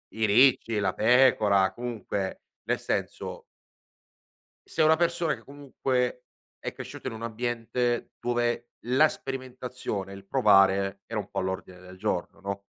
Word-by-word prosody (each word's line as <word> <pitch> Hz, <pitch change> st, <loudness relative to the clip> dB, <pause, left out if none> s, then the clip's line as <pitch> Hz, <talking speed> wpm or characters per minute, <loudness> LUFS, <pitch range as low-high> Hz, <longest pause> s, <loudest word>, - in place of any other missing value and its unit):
i 110 Hz, 0 st, +1 dB
ricci, 115 Hz, 0 st, +4 dB
la 100 Hz, -, +1 dB
pecora, 110 Hz, -6 st, +4 dB
comunque, 105 Hz, -4 st, -4 dB, 0.3 s
nel -, -, +2 dB
senso -, -, -3 dB, 1.2 s
sei 160 Hz, -, +1 dB
una 160 Hz, +1 st, +6 dB
persona 170 Hz, -1 st, +1 dB
che -, -, -13 dB
comunque 130 Hz, -3 st, -2 dB, 0.4 s
è -, -, -4 dB
cresciuta -, -, -7 dB
in -, -, -6 dB
un 110 Hz, -, -8 dB
ambiente 120 Hz, +1 st, -2 dB
dove 120 Hz, 0 st, 0 dB, 0.2 s
la 130 Hz, +6 st, +5 dB
sperimentazione 125 Hz, -8 st, -5 dB
e -, -, -7 dB
il 100 Hz, -, -12 dB
provare 95 Hz, -1 st, +4 dB
era 115 Hz, 0 st, -3 dB
un 100 Hz, -1 st, -4 dB
po' 100 Hz, -, -2 dB
all'ordine 95 Hz, -1 st, -4 dB
del 90 Hz, 0 st, -12 dB
giorno, 95 Hz, -3 st, -2 dB
no? 100 Hz, 0 st, -5 dB
115 Hz, 140 wpm, -27 LUFS, 100-125 Hz, 1.2 s, una